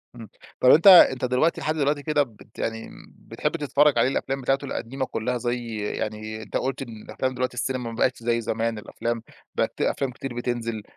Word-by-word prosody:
امم، 115 -4 -10 0.3
طب 125 - +5
أنت 165 +9 +6
أنت 130 -9 +8
دلوقتي 125 +7 +1
لحد 155 - -1
دلوقتي 145 -1 0
كده 150 -2 +2
بت 110 -3 -16
يعني 115 0 -3 0.3
بتحب - - -3
تتفرج 145 -2 +3
عليه 115 - +4
الأفلام 135 0 -2
بتاعته 135 +2 0
القديمة 130 +1 -4
كلها، 125 +1 -2
زي 120 -1 -3
يعني 110 +1 -4
أنت - - -3
قلت 135 0 -2
إن 115 -4 -8
الأفلام 130 0 -3
دلوقتي 125 0 -2
السينما 125 0 -2
ما 115 - -8
بقتش 125 +2 +1
زي 115 0 +1
زمان، 115 0 -2
الأفلام 115 +2 -4 0.3
بقت - - 0
في - - +3
أفلام 135 -2 -3
كتير 130 +1 -7
بتنزل، 115 -3 -3
125 Hz, 190 wpm, -25 LUFS, 115-135 Hz, 0.3 s, أنت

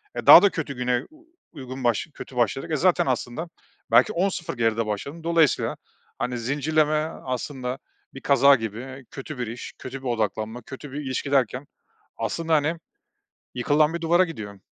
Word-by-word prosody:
E, - - -4
daha - - +12
da 200 - +5
kötü 150 -5 -4
güne, 125 0 0
u 315 +1 -20 0.3
uygun 130 -3 -8
başla 120 +5 0
kötü 130 - -10
başladık, 120 +7 0
e, - - +2
zaten 180 +4 +3
aslında 130 +5 -2 0.4
belki 215 - +5
10-0 175 -6 -1
geride 115 -1 +1
başladım. 140 +10 -5
Dolayısıyla, 165 -3 +2 0.4
hani, 125 0 -2
zincirleme 150 +5 +1 0.3
aslında 130 0 -4 0.3
bir 135 - -9
kaza 140 0 +6
gibi, 125 +4 -6
kötü 140 +1 -7
bir 125 - -3
iş, 115 +2 -7
kötü 130 +1 -7
bir 130 - -6
odaklanma, 110 0 -2
kötü 135 +2 -10
bir 145 - -5
ilişki 135 +1 -3
derken 130 0 +1 0.5
aslında, 165 -1 -2
hani, 155 +3 +1 0.8
yıkılan 150 +6 +2
bir 170 - -4
duvara 175 +3 +4
gidiyor. 105 - -8
135 Hz, 165 wpm, -24 LUFS, 120-155 Hz, 0.8 s, daha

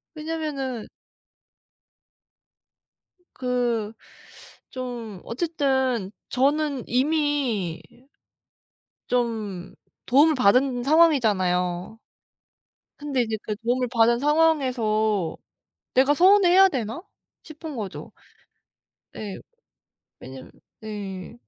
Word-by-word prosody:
왜냐하면은 305 -7 -4 2.5
그 240 -4 -1 0.8
좀 240 -6 -7
어쨌든 265 - -1 0.2
저는 280 0 +1
이미 260 - 0 1.3
좀 220 -7 -2 0.3
도움을 295 +5 +4
받은 250 +2 +3
상황이잖아요. 210 - +2 1.0
근데 285 -3 -1
이제 220 -2 -2
그 210 - -3
도움을 245 +3 -1
받은 235 0 +4
상황에서 245 - +1 0.6
'내가 270 +3 +4
서운해 375 +3 +5
해야 385 +2 +7
되나?' 240 - -4 0.4
싶은 310 -2 -9
거죠. 205 -4 -7 1.0
네. 205 -3 -6 0.8
왜냐하면 130 0 -11 0.3
네 200 -4 -7
250 Hz, 165 characters per minute, -24 LUFS, 215-290 Hz, 2.5 s, 해야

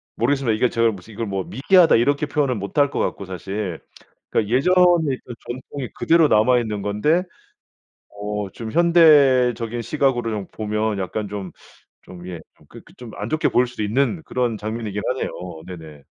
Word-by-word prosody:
모르겠습니다. 125 -1 +1
이게 120 +3 +2
제가 115 0 +2
무슨 100 +2 -11
이걸 115 +2 -4
뭐 95 -2 -3
"미개하다." 165 - +4
이렇게 140 +6 +2
표현을 140 -4 0
못할 120 +8 0
것 - - -3
같고 100 - -2
사실 95 -1 -5 0.5
그 105 - 0
예전의 165 +2 +3
그 120 - -8
전통이 130 +1 -6
그대로 165 -1 +4
남아 125 +3 +4
있는 105 -3 -4
건데 105 - +1 0.9
어 105 0 -5
좀 115 -2 -7
현대적인 135 -9 +4
시각으로 125 -2 0
좀 105 -3 -4
보면 105 -1 -2
약간 105 +3 -3
좀, 100 -3 -6 0.6
좀 90 -1 -11
예 90 -2 -6 0.2
좀 - - -24
그렇게 - - -15
좀 120 -2 -10
안 105 - -5
좋게 155 +3 +1
보일 125 - +2
수도 120 -3 -6
있는 135 - 0
그런 125 -3 -1
장면이긴 105 -1 -4
하네요. 130 - -2 0.4
네네. 80 -5 -11
115 Hz, 340 characters per minute, -21 LUFS, 105-140 Hz, 0.9 s, 미개하다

